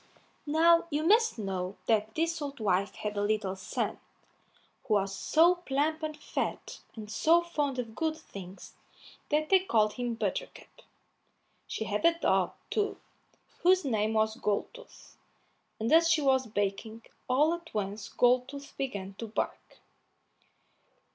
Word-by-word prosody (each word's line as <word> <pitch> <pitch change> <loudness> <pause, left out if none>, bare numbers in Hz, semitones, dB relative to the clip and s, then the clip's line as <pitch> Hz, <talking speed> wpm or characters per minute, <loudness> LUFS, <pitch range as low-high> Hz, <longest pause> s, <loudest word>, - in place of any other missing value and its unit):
Now 335 +3 +4
you 300 0 -1
must 440 - +4
know 190 -2 -4
that 220 -1 +1
this 330 0 0
old 285 -2 -5
wife 200 -1 0
had 210 0 -4
a 205 - -1
little 205 -2 0
son, 190 - -3 0.9
who 215 - +3
was 195 -1 0
so 330 - +4
plump 310 -1 -1
and 310 -1 -4
fat, 295 - -4 0.2
and 215 -2 -8
so 325 +11 +3
fond 295 -6 -2
of 230 -3 -4
good 315 +4 -1
things, 195 - -11 0.6
that 305 +1 +1
they 385 - +6
called 220 - +2
him 245 0 -3
Buttercup; - - -5 0.9
she - - -3
had 210 -1 -2
a 335 0 +4
dog, - - +1 0.2
too, 420 -1 0 0.6
whose 365 -1 +4
name 220 -4 0
was 220 0 +1
Goldtooth, 485 - -4 0.6
and 225 +6 0
as 330 +1 +6
she 330 -2 +3
was 265 -2 +3
baking, 215 +2 -3 0.3
all 295 +6 +4
at 340 -1 -7
once 205 0 -4
Goldtooth 255 +3 +1
began 200 -8 -4
to 230 - -4
bark. 215 - -4
255 Hz, 140 wpm, -30 LUFS, 210-320 Hz, 0.9 s, they